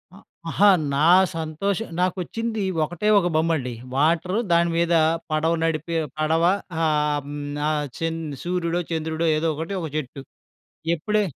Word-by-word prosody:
ఆ! - - -13 0.3
అహా! 205 +4 +5 0.2
నా 140 - +1 0.3
సంతోషం 165 +7 -2
నాకొచ్చిందీ 200 +4 -1 0.2
ఒకటే 175 +6 -3
ఒక 175 - 0
బొమ్మండి. 155 -6 0 0.2
వాటరు 170 +8 +2
దాని 170 0 +4
మీదా 170 -1 +3 0.3
పడవ 160 +2 +1
నడిపే 165 +1 -1 0.2
పడవ 160 +2 +2 0.4
ఆహ్, 150 -1 +1
హ్మ్, 145 0 -6 0.3
ఆహ్, 150 -1 0
చన్ 165 0 -2 0.2
సూర్యుడో, 175 -1 -1
చంద్రుడో 160 +1 -1
ఏదో 160 +1 0
ఒకటి, 165 +5 -4
ఒక 160 - -4
చెట్టు. 135 -1 -5 0.7
ఎప్పుడే 210 +6 0
165 Hz, 130 wpm, -23 LUFS, 155-175 Hz, 0.7 s, అహా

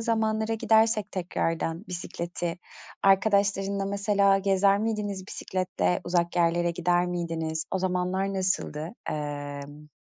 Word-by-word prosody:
zamanlara 220 -1 0
gidersek 220 -1 +3
tekrardan 165 -1 -2
bisikleti, 175 -1 -4 0.4
arkadaşlarınla 200 0 +3
mesela 200 0 +3
gezer 195 0 +3
miydiniz 205 -3 -2
bisikletle, 185 - -1
uzak 175 0 0
yerlere 170 0 +2
gider 175 +1 +1
miydiniz? 165 -2 -2
O 190 - 0
zamanlar 185 +1 -1
nasıldı? 185 -2 -1 0.2
Emm, 145 0 -5
185 Hz, 100 wpm, -27 LUFS, 170-200 Hz, 0.4 s, gidersek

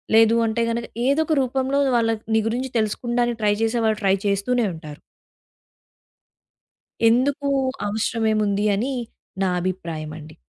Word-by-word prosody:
లేదు 225 0 +6
అంటే 225 +1 -1
గనక 235 0 -2 0.2
ఏదొక 310 +4 +2
రూపంలో 265 +2 0 0.2
వాళ్ళ 230 -1 +2 0.2
నీ 220 - +4
గురించి 255 +3 -2
తెలుసుకుండానికి 240 +2 -1
ట్రై 205 -1 +4
చేసే 225 +1 +1
వాళ్ళు 215 -1 +1
ట్రై 195 -1 +4
చేస్తూనే 210 +5 +1
ఉంటారు. 155 -2 -10 2.1
ఎందుకు? 275 +5 +1 0.4
అవసరమేముంది? 215 -1 0
అని 250 +7 -1 0.5
నా 190 - +2
అభిప్రాయమండి. 160 -4 -5
225 Hz, 115 wpm, -22 LUFS, 200-245 Hz, 2.1 s, లేదు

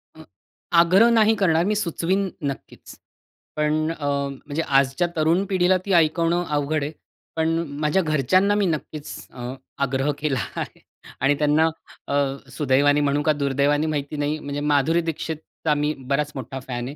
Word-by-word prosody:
अ - - -12 0.6
आग्रह 190 +7 +5
नाही 225 -1 +4
करणार 170 -5 +2
मी 210 +2 +1
सुचवीन 190 0 0 0.2
नक्कीच. 135 - -12 0.6
पण 155 +1 0
अ, 155 -3 -6
म्हणजे 140 +2 -2
आजच्या 135 +3 +2
तरुण 165 +4 +2
पिढीला 185 -1 +2
ती 200 - 0
ऐकवणं 170 +1 +3
अवघड 150 0 0
आहे. 145 - -3 0.4
पण 160 0 +1 0.3
माझ्या 150 +5 +2
घरच्यांना 175 +6 +2
मी 205 -1 +2
नक्कीच 155 -3 -4 0.2
अ, 125 0 -6 0.3
आग्रह 135 +2 0
केला 145 -4 0 0.2
आहे. - - -5 0.4
आणि 140 +2 +3
त्यांना 150 +2 +3 0.4
अ, - - -3 0.4
सुदैवाने 145 0 +3
म्हणू 145 0 +1
का, 155 - +3
दुर्दैवाने 145 +1 +1
माहिती 145 -1 -3
नाही. 145 +1 -1
म्हणजे 145 -1 -5
माधुरी 150 +3 +2
दीक्षितचा 160 -1 -3
मी 150 +1 0
बराच 140 +3 -1
मोठा 135 0 -6
फॅन 125 -2 -5
आहे, 140 - -7
150 Hz, 150 wpm, -23 LUFS, 140-165 Hz, 0.6 s, आग्रह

